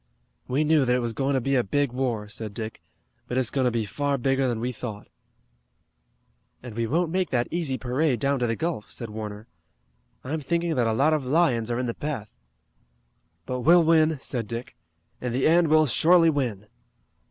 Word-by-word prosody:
"We 135 +4 +1
knew 155 -1 +3
that 125 -1 +2
it 125 - 0
was 120 -1 -2
going 135 +4 0
to - - +3
be 135 +3 0
a 125 - +3
big 145 +5 0
war," 120 -5 -2
said 105 0 -6
Dick, 110 -1 -6 0.5
"but 125 - -3
it's 130 -3 +2
going 135 -2 0
to - - +4
be 115 -2 -1
far 140 +5 -1
bigger 135 +1 +1
than 120 -3 -1
we 125 +2 -2
thought." 110 -3 -7 1.6
"And 125 -3 -8
we 115 0 -1
won't 165 +5 0
make 185 0 0
that 120 -2 0
easy 160 -6 -1
parade 130 +1 0
down 140 +3 +1
to 120 - +1
the 115 - 0
Gulf," 160 -6 -3
said 115 -3 -7
Warner. 105 0 -7 0.8
"I'm 150 +4 -3
thinking 170 +3 -1
that 125 -5 +1
a 110 - +1
lot 140 +7 +3
of 150 -3 0
lions 130 -5 +2
are 120 - -1
in 125 - -1
the 120 - -2
path." 135 -8 -5 1.1
"But 125 0 -3
we'll 170 +7 +5
win!" 160 -1 +3
said 120 -6 -3
Dick. 120 +4 -6 0.5
"In 125 -1 -3
the 130 +2 +2
end 170 +1 +4
we'll 155 0 +5
surely 165 +5 +4
win!" 120 -9 -2
130 Hz, 200 wpm, -25 LUFS, 115-155 Hz, 1.6 s, we'll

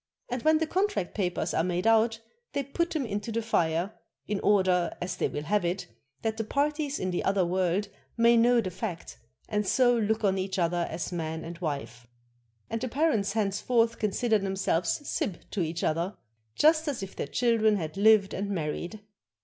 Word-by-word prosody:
And 250 0 -2
when 315 +3 +4
the 320 - 0
contract 370 - -1
papers 180 -4 -1
are 160 - +2
made 180 +1 -1
out, 225 0 +4 0.3
they 280 -1 0
put 340 +6 -1
them 310 -6 -2
into 205 +1 -3
the 230 +1 -1
fire, 175 -2 0 0.3
in 205 -1 -1
order 185 -4 +2
(as 180 - -3
they - - 0
will 145 - -5
have 205 +4 +1
it) 175 +2 -1 0.4
that 220 -1 -1
the 225 - -1
parties 290 +4 -1
in 185 - -1
the 175 - -1
other 195 -2 +2
world 185 +3 0 0.3
may 235 0 +5
know 235 +1 +5
the 185 -4 -4
fact, 180 -2 -6 0.3
and 210 -2 -1
so 245 +1 +4
look 220 -1 0
on 195 -1 +2
each 190 +1 -3
other 175 -1 +1
as 165 +2 -4
man 160 -2 -3
and 170 0 -8
wife. 140 -8 -4 0.6
And 225 - -3
the 255 - -1
parents 230 -8 +1
thenceforth 225 +2 +1
consider 220 +1 +1
themselves 195 - -1
sib 180 - -1
to 200 - -1
each 165 0 -2
other, 170 +5 0 0.4
just 315 +1 +4
as 265 -8 -2
if 195 - -8
their - - -3
children 220 - +2
had 160 -5 -4
lived 205 -1 +5
and 200 +1 -3
married. 175 +3 -3
205 Hz, 190 wpm, -28 LUFS, 175-230 Hz, 0.6 s, may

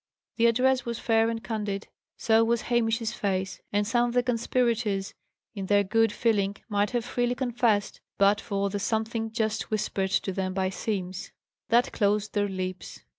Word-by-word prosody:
The 235 0 +5
address 255 +3 +3
was 235 -1 -4
fair 225 -1 +2
and 225 -1 -4
candid; 205 -1 -3 0.3
so 225 0 +4
was 230 0 +1
Hamish's 225 -2 0
face; 190 -2 -2
and 205 0 +1
some 240 +2 +2
of 240 - -4
the 245 - +4
conspirators, 230 -4 0 0.4
in 195 -3 -5
their 205 0 +4
good 225 +2 +2
feeling, 205 -3 +1
might 205 -2 +1
have 240 -2 -2
freely 245 0 0
confessed, 240 -5 0 0.2
but 200 +1 +4
for 200 0 -2
the 205 - -2
something 225 +2 -1
just 220 -1 -1
whispered 205 -3 -1
to 190 - 0
them 185 0 -2
by 190 -1 0
Simms. 185 -3 -4 0.4
That 240 +3 +3
closed 210 0 +1
their 205 -1 +1
lips. 185 -1 -5
220 Hz, 170 wpm, -27 LUFS, 200-235 Hz, 0.4 s, The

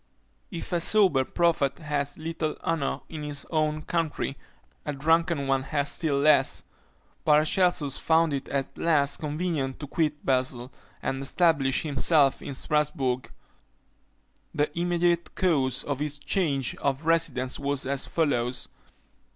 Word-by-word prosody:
If 170 -7 -7
a 170 - +1
sober 185 -8 +3
prophet 155 -3 +1
has 145 -3 -2
little 160 -1 -3
honour 160 -4 -1
in 155 -2 -7
his 145 -1 -3
own 155 -1 0
country, 160 -5 -2 0.5
a 150 - -3
drunken 160 +1 +1
one 135 -1 +1
has 145 +1 -1
still 155 -5 -1
less. 140 -2 +3 0.6
Paracelsus 155 0 +2
found 160 -1 +3
it 135 -1 -4
at 135 -1 -2
last 145 -4 +2
convenient 150 -3 -2
to 145 - -5
quit 150 0 -1
Basle, 130 -1 -1 0.3
and 135 0 -2
establish 140 -2 +2
himself 145 -1 +3
at 140 - -6
Strasbourg. 140 -4 -1 1.2
The 150 +1 0
immediate 175 0 0
cause 140 -9 +1
of 140 -2 -3
this 150 0 -2
change 140 -5 0
of 140 +2 -2
residence 160 -6 +1
was 140 -1 -1
as 135 0 0
follows. 125 -6 -1
150 Hz, 130 wpm, -27 LUFS, 135-165 Hz, 1.2 s, sober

